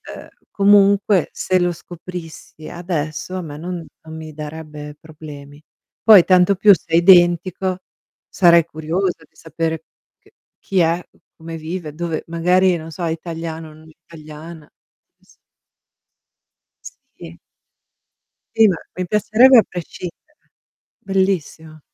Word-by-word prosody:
uhm, - - -11 0.2
comunque, 200 -2 +3
se 185 -1 0
lo 175 0 +1
scoprissi 170 -2 -10
adesso, 170 0 -4
a - - -4
me 150 -3 -8
non 175 0 -6 0.2
non 160 0 -9
mi 155 -1 -9
darebbe 150 -1 -9
problemi. 150 -2 -12 0.4
Poi 210 -6 +8
tanto 185 +1 +4
più 200 +2 +6
se - - -14
è - - +5
identico, 180 +1 +4 0.5
sarei 170 -3 +4
curiosa 165 +2 -3
di - - -47
sapere 160 0 -4 0.4
c - - -26 0.3
chi 190 -2 -2
è, 170 +1 +2 0.4
come 165 0 -8
vive, 160 -1 -6
dove 165 -1 -4
magari, 180 +2 +2
non 160 0 -9
so, 175 - -7
è 165 - -1
italiano 165 -1 -6
o 155 - -15
non 155 +1 -17
italiana. 155 0 -13 0.5
Eh - - -35
sì. - - -25 1.8
Sì. 85 +1 -11 1.2
Sì, 220 -1 +6
ma 180 - 0 0.2
mi 185 - -3
piacerebbe 215 +6 +5
a 220 - +7
prescindere, 180 - -9 0.6
bellissimo. 185 -5 -2
170 Hz, 130 wpm, -19 LUFS, 155-185 Hz, 1.8 s, Poi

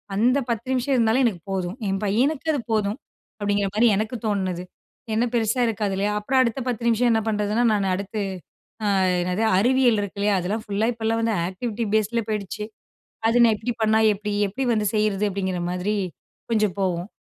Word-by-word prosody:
அந்த 245 +6 +3
10 235 +1 -2
நிமிஷம் 260 +2 0
இருந்தாலும் 235 +2 +3
எனக்கு 195 -8 -1
போதும், 185 0 -2
என் 195 +1 -1
பையனுக்கு 265 +10 +1
அது 285 - 0
போதும், 210 0 0 0.4
அப்படிங்கிற 205 -1 0
மாதிரி 235 +2 +5
எனக்கு 215 +4 -2
தோன்னது, 190 -4 -1 0.5
என்ன 225 +2 +2
பெருசா 230 +1 +1
இருக்காது 210 -3 -1
இல்லையா. 200 +2 0
அப்புறம் 260 +6 +1
அடுத்த 245 +1 0
பத்து 240 -2 -2
நிமிஷம் 235 +1 +3
என்ன 225 - +3
பண்ணுறதுன்னா. 210 +2 +1
நான் 200 -2 +1
அடுத்து 200 +3 -5 0.7
ஆ - - +1 0.3
என்னது 180 +5 -1
அறிவியல் 245 +1 +3
இருக்கு 205 0 -5
இல்லையா 205 0 +2
அதெல்லாம் 205 +5 -2
ஃபுல்லா 205 +1 0
இப்போலாம் 225 0 -1
வந்து 230 0 +1 0.2
ஆக்டிவிட்டி 225 +4 -3
பேஸ் 215 -1 +2
ல 230 - +3
போயிடுச்சு, 210 -1 -3 0.6
அது 230 - +2
நான் 225 -2 +5
எப்படி 240 +3 -3
பண்ணா 220 0 +4 0.2
எப்படி, 210 +1 -4 0.2
எப்படி 255 +8 -3
வந்து 215 -2 +1
செய்றது, 210 -1 +1
அப்படிங்கிற 185 -2 -2
மாதிரி 180 +4 -1 0.6
கொஞ்சம் 210 -4 +1
போவும். 180 -1 -1
215 Hz, 180 wpm, -23 LUFS, 200-230 Hz, 0.7 s, மாதிரி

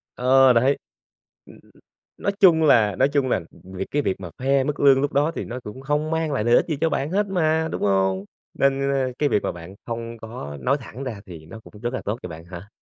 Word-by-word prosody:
Ờ, 130 0 +5
đấy. 130 +4 +3 0.7
Ừm, - - -16 0.6
nói 200 - -1
chung 170 -5 +6
là 110 -9 +4
nói 135 - +3
chung 140 -2 0
là, 95 - +1
ừm, 95 - -16
việc 95 - -3
cái 145 - 0
việc 95 - -2
mà 90 -3 -7
khoe 135 +1 +2
mức 145 0 -3
lương 135 -1 +6
lúc 145 +1 -1
đó 145 +3 +2
thì - - -4
nó 125 +2 -6
cũng 120 +3 -9
không 150 +3 -1
mang 160 -2 -1
lại 125 -6 -1
lợi 120 +1 +5
ích - - +2
gì 155 - -1
cho 165 - +2
bạn 140 +4 -1
hết 205 +2 +1
mà, 160 -4 +1
đúng - - -4
hông? 95 -1 +1 0.3
Nên, 140 0 +1
ơ, 130 -2 0
cái 150 - +2
việc 105 - +1
mà - - -2
bạn 85 +2 -11
không 115 0 -5
có 110 - -8
nói 135 +2 +1
thẳng 125 +3 -8
ra 115 -6 -5
thì 80 -4 -11
nó 110 +7 -10
cũng 105 - -14
rất 120 +2 -2
là - - -3
tốt 105 +3 -2
cho - - -6
bạn 80 0 -10
hả? 90 +3 -10
130 Hz, 255 wpm, -23 LUFS, 105-145 Hz, 0.7 s, chung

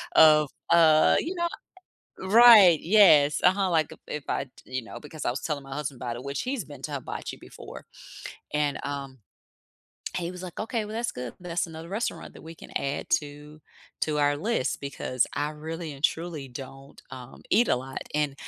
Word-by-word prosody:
of, 150 -2 +6 0.2
uh, 160 -2 +5
you 360 +4 -4
know 345 0 0 0.7
right. 205 -4 +8
Yes. 155 -7 +5
Uh-huh. 190 +1 +3
Like, 160 -3 +1 0.2
if 150 -2 -6
I, 135 - -1 0.2
you 130 0 -4
know, 115 - -9
because 155 +1 -9
I - - +2
was 130 - -4
telling 145 -3 -3
my 135 0 -9
husband 140 -4 -5
about 120 -1 -4
it, 125 - -9
which 140 0 -3
he's 255 -5 -3
been 145 -3 -12
to 150 - -5
hibachi 135 - -6
before, - - -12 0.7
and, 150 -1 0
um, 140 -2 -5 1.0
he 175 -1 -3
was 180 0 -9
like, 180 -2 -8
"Okay. 225 0 -2
Well, 215 - -7
that's 230 +1 -2
good. 125 -1 -7
That's 175 0 -2
another 165 +1 -10
restaurant 215 +4 -4
that - - -13
we 165 +1 -10
can - - -14
add 140 +1 -2
to 150 +1 -12 0.4
to 150 -1 0
our 145 0 +3
list," 195 - -1
because 130 -2 -2
I 145 +1 -1
really 160 +1 -6
and 140 +1 -12
truly 160 -4 -1
don't, 135 +2 -11
um, 130 -1 -11
eat 235 +3 +4
a - - +3
lot, 130 +1 -6
and 150 -2 0
150 Hz, 185 wpm, -26 LUFS, 140-180 Hz, 1.0 s, right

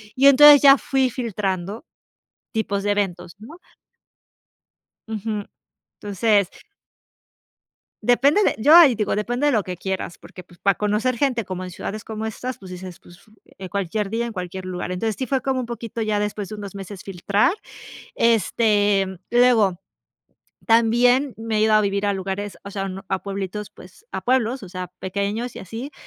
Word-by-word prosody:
Y 275 +2 +5
entonces 290 +1 +9
ya 275 -1 +8
fui 265 -2 +1
filtrando 205 - -3 0.7
tipos 200 -3 -1
de 205 - +1
eventos, 180 -3 -3
¿no? 270 - -12 1.5
Ujú. 215 -1 -4 0.6
Entonces 205 -1 +1 1.5
depende 280 +10 +3
de - - +2
yo 295 +9 +5
ahí 315 -8 +8
digo, 210 -2 -1
depende 245 +7 -1
de 290 - +3
lo 215 -3 +2
que 180 -1 -6
quieras, 190 -1 -4
porque, 180 - -13
pues, 175 -1 -20
para 195 -1 +2
conocer 210 +4 0
gente 245 -3 0
como 185 0 -5
en 180 - -7
ciudades 215 +4 -6
como 220 -1 -5
estas, 250 +3 -5
pues, 190 -2 -12
dices: 180 -1 -9
"Pues 175 0 -17 0.4
en 190 -1 -7
cualquier 200 +2 -2
día, 230 +2 -1
en 235 - -6
cualquier 185 -1 -6
lugar". 180 0 -4
Entonces, 215 +3 -2
sí, 260 - -2
fue 265 +1 0
como 265 0 -1
un 250 - -4
poquito 230 -1 -5
ya 215 -1 0
después 210 -1 -3
de 215 - -7
unos 200 -2 -8
meses 195 -1 -8
filtrar 200 - +1 0.6
este 205 -3 +2 0.2
luego 230 -7 +3 0.9
también 240 +4 +3
me 225 -1 -2
he 215 - +2
ido 220 0 +3
a 215 - +5
vivir 200 0 -1
a 200 - +1
lugares 195 +1 -4
o 200 - -8
sea, 195 -1 -3 0.2
a 190 - -1
pueblitos, 200 +1 -5
pues, 450 - -17
a - - -4
pueblos, 255 -1 0
o 190 - -10
sea, 185 0 -6
pequeños 200 +5 -3
y - - -7
así, 225 - -7
210 Hz, 170 wpm, -22 LUFS, 195-240 Hz, 1.5 s, entonces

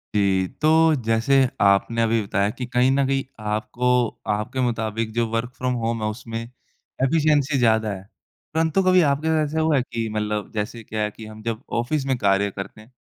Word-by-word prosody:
जी, 95 -2 +2
तो 155 - +4 0.4
जैसे 115 +5 +2 0.3
आपने 100 +4 +3
अभी 115 0 +2
बताया 100 +1 0
कि 125 - -3
कहीं 125 +1 +2
न 135 0 +2
कहीं 135 0 0 0.2
आपको, 120 +3 0 0.2
आपके 105 +6 -2
मुताबिक 115 -2 -1
जो 120 0 +1
वर्क 115 +2 -2
फ्रॉम 125 0 -1
होम 115 0 -1
है, 110 - 0
उसमें 115 +1 -6 0.6
एफिशिएंसी 150 0 +2
ज़्यादा 110 -2 +2
है। 95 -1 -8 0.5
परंतु 160 +4 +2
कभी 185 0 +5
आपके 145 +3 -2 0.2
ऐसा 150 +2 -2
हुआ 155 -3 +3
कि 115 -2 -4
मतलब 105 -1 -2
जैसे 110 +2 -4
क्या 110 0 -4
है 105 - -2
कि 110 - -11
हम 110 0 -11
जब 115 -1 -3 0.2
ऑफ़िस 135 +4 -1
में 135 -1 +1
कार्य 100 -2 +2
करते 100 +3 -8
हैं, 110 +4 -19
115 Hz, 185 wpm, -23 LUFS, 105-135 Hz, 0.6 s, कभी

